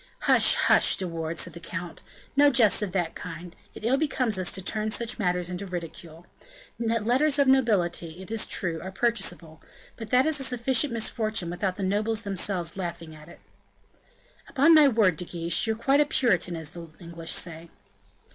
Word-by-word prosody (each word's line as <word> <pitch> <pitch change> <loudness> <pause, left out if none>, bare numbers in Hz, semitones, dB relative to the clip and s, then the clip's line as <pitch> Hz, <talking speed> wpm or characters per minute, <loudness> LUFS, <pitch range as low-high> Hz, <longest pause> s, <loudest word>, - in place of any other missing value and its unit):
"Hush, - - +5
hush, - - +4
De 185 - -3
Wardes," 165 -1 -4
said - - -2
the 170 - -9
count; 175 0 -7 0.3
"no 290 +1 +6
jests 235 -7 +3
of 205 -3 -2
that 175 -3 -1
kind; 170 0 -9 0.2
it - - -8
ill 255 +4 +3
becomes 255 -8 0
us 185 - 0
to - - -2
turn 215 +3 -2
such 230 +2 -3
matters 180 -2 -1
into 185 +2 -5
ridicule. 170 -1 -8 0.5
Letters 235 +6 +1
of 280 -1 +3
nobility, 185 -10 +1
it 190 +3 -10
is 225 -1 -3
true, 165 -3 -1
are 190 - -7
purchasable; 190 -8 -2 0.4
but 225 -2 -8
that 255 +2 +4
is 310 -2 +1
a - - +1
sufficient 255 +2 +1
misfortune 220 -5 -2
without 185 +1 -2
the 200 - -5
nobles 215 +3 -1
themselves 190 -3 -2
laughing 170 -3 -6
at 155 +1 -14
it." - - -15 1.1
"Upon 295 +3 +4
my 305 -2 +7
word, 215 - +2
De 180 - -4
Guiche, 170 +4 -2
you're 220 - 0
quite 270 +6 +2
a - - +3
Puritan, 195 - +1
as 160 -2 -7
the 170 -1 -9
English 170 -2 -6
say." 165 -1 -5
190 Hz, 185 wpm, -26 LUFS, 170-235 Hz, 1.1 s, my